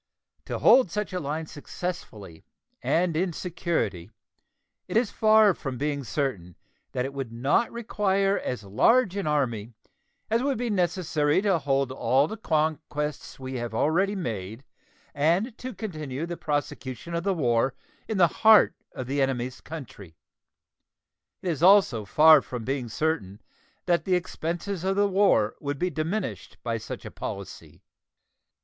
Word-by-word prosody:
To -, -, -3 dB
hold 255 Hz, -7 st, +6 dB
such 210 Hz, +1 st, -3 dB
a 180 Hz, -, -1 dB
line 155 Hz, +2 st, -3 dB
successfully 140 Hz, -, -7 dB, 0.4 s
and 170 Hz, -1 st, +1 dB
in 175 Hz, +1 st, 0 dB
security 165 Hz, -, -2 dB, 0.8 s
it -, -, 0 dB
is 230 Hz, -2 st, +2 dB
far 215 Hz, -2 st, +5 dB
from 135 Hz, -6 st, -5 dB
being 145 Hz, 0 st, -2 dB
certain 110 Hz, -, -3 dB, 0.4 s
that 125 Hz, -, -1 dB
it 135 Hz, -, -5 dB
would 135 Hz, -4 st, -5 dB
not 135 Hz, -, +1 dB
require 200 Hz, -4 st, 0 dB
as 125 Hz, -5 st, -4 dB
large 195 Hz, -, +3 dB
an 200 Hz, -5 st, -2 dB
army 120 Hz, -7 st, -1 dB, 0.5 s
as 225 Hz, +2 st, +1 dB
would 275 Hz, -1 st, 0 dB
be 240 Hz, -1 st, -2 dB
necessary 170 Hz, -6 st, +1 dB
to 195 Hz, -5 st, +2 dB
hold 135 Hz, -2 st, 0 dB
all 135 Hz, +2 st, +2 dB
the 220 Hz, -, -5 dB
conquests 155 Hz, -6 st, -2 dB
we 130 Hz, 0 st, -5 dB
have 120 Hz, -2 st, -4 dB
already 185 Hz, -, +2 dB
made 110 Hz, -, -5 dB, 0.5 s
and 175 Hz, -, +1 dB
to 255 Hz, -, -5 dB
continue 155 Hz, -, -5 dB
the 175 Hz, 0 st, -5 dB
prosecution 145 Hz, 0 st, -4 dB
of 170 Hz, 0 st, -1 dB
the 195 Hz, -1 st, +1 dB
war 125 Hz, -3 st, +1 dB, 0.3 s
in 220 Hz, -, -2 dB
the 175 Hz, -2 st, +6 dB
heart 220 Hz, -1 st, +7 dB, 0.2 s
of 130 Hz, -, -5 dB
the 140 Hz, +3 st, -1 dB
enemy's 130 Hz, -1 st, -1 dB
country. 110 Hz, -, -10 dB, 1.3 s
It 185 Hz, -, -1 dB
is 160 Hz, -3 st, -2 dB
also 180 Hz, -, +5 dB
far 155 Hz, +9 st, +7 dB
from 120 Hz, -3 st, -6 dB
being 130 Hz, -3 st, -2 dB
certain 110 Hz, -6 st, -2 dB, 0.5 s
that 170 Hz, -3 st, +1 dB
the 185 Hz, -, +2 dB
expenses 175 Hz, +1 st, -3 dB
of 190 Hz, +1 st, +1 dB
the 205 Hz, 0 st, +3 dB
war 190 Hz, -, +3 dB
would 145 Hz, 0 st, -3 dB
be 180 Hz, +5 st, -1 dB
diminished 170 Hz, +7 st, -3 dB
by 115 Hz, -1 st, -2 dB
such -, -, -8 dB
a -, -, -7 dB
policy. -, -, -8 dB
155 Hz, 150 wpm, -26 LUFS, 130-190 Hz, 1.3 s, heart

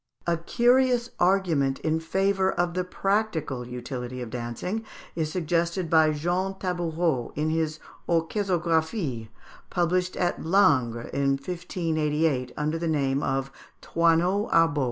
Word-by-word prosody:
A 170 Hz, -, +2 dB
curious 245 Hz, +6 st, +2 dB
argument 170 Hz, -8 st, +2 dB
in 160 Hz, 0 st, 0 dB
favour 190 Hz, +3 st, +1 dB
of 175 Hz, 0 st, 0 dB
the 180 Hz, +1 st, 0 dB
practical 180 Hz, -, -1 dB
utility 125 Hz, 0 st, -6 dB
of 115 Hz, -, -8 dB
dancing 125 Hz, -, -4 dB, 0.3 s
is 155 Hz, -2 st, -1 dB
suggested 170 Hz, 0 st, -1 dB
by 160 Hz, -1 st, +6 dB
Jean 175 Hz, +5 st, -1 dB
Tabourot 170 Hz, -8 st, -1 dB
in 155 Hz, +2 st, 0 dB
his 160 Hz, -1 st, -1 dB, 0.3 s
"Orchésographie," 165 Hz, -, 0 dB, 0.4 s
published 180 Hz, +1 st, 0 dB
at 175 Hz, -1 st, 0 dB
Langres 130 Hz, -, +2 dB
in 140 Hz, 0 st, +2 dB
1588, 155 Hz, -5 st, -1 dB
under 155 Hz, +2 st, -1 dB
the 170 Hz, -, -2 dB
name 140 Hz, -3 st, +1 dB
of 135 Hz, -1 st, -1 dB, 0.3 s
Thoinot 170 Hz, +5 st, +2 dB
Arbeau. 165 Hz, -3 st, +4 dB
165 Hz, 120 wpm, -26 LUFS, 145-180 Hz, 0.4 s, by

